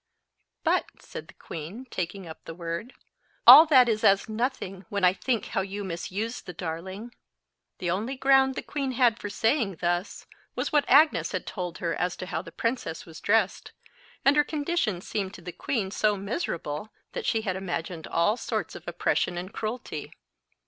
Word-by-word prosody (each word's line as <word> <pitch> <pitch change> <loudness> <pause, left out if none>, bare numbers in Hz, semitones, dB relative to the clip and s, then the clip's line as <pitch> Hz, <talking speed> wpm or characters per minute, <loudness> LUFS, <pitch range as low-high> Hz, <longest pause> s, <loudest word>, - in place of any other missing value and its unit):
"But," - - +2
said - - -9
the - - -16
queen, 170 +11 -8
taking 185 +2 -4
up 160 - -10
the 165 - -7
word, 170 +8 -5 0.5
"all 290 +7 +12
that 260 -5 +7
is 220 -2 0
as 195 0 +4
nothing, 215 -4 -3
when 200 -2 -2
I 180 0 +6
think 235 +2 -1
how 195 - 0
you 200 +1 -5
misused 195 +6 -4
the 180 - -6
darling." 185 +7 -6 0.6
The 175 -2 -1
only 220 +9 -2
ground 270 0 +4
the - - -4
queen 275 -3 -3
had 235 -2 +3
for 205 - -5
saying 220 - +1
thus, 175 +3 -2 0.3
was - - -2
what 295 -1 +3
Agnes 300 +4 +5
had - - -2
told 180 -3 -5
her 170 -2 -1
as 180 0 -1
to - - -6
how 180 - -3
the 170 -2 -11
princess 230 -8 -2
was 165 -1 -11
dressed; 205 -2 +1 0.5
and 275 +2 +6
her 295 - +5
condition 290 - -1
seemed 195 0 -3
to - - -11
the 180 - -6
queen 200 -1 -2
so 210 0 +2
miserable, 195 - -3 0.2
that - - -4
she 225 - +2
had 190 -4 -1
imagined 175 -3 -4
all 205 +7 +2
sorts - - -3
of - - -11
oppression 175 - 0
and 185 +3 -6
cruelty. 215 -9 -5
200 Hz, 180 wpm, -27 LUFS, 180-245 Hz, 0.6 s, all